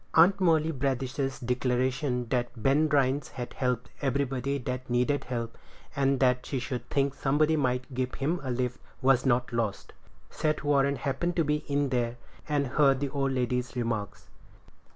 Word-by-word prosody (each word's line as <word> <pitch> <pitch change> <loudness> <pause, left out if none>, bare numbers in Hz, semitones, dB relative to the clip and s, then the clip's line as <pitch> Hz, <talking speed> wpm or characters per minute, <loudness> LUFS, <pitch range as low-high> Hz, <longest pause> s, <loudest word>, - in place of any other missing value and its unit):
Aunt 190 +4 +6
Molly 160 -3 +3
Bradish's 135 -1 -2
declaration 125 +1 0
that 120 -1 0
Ben 150 +5 +3
Rhines 140 -1 +2
had 125 -1 -7
helped 125 -2 -2
everybody 135 0 0
that 125 0 -5
needed 125 +4 +1
help, 115 -2 -4 0.4
and 135 -1 +2
that 125 -1 +3
she 135 - -3
should 125 0 -4
think 140 -1 +1
somebody 150 +4 +2
might 125 -2 -1
give 130 0 -2
him 160 +6 -1
a 135 - -5
lift, 125 0 -1 0.2
was 130 0 +4
not 125 -1 +1
lost. 115 -4 -2 0.4
Seth 155 -1 -1
Warren 140 -1 +3
happened 140 +6 -2
to 165 - +3
be 150 0 +1
in 140 -1 +1
there, 120 -2 -1 0.3
and 145 -1 +1
heard 135 0 +3
the 140 0 -1
old 135 -1 -1
lady's 125 0 -1
remarks. 115 -4 -3
135 Hz, 160 wpm, -28 LUFS, 125-140 Hz, 0.4 s, Aunt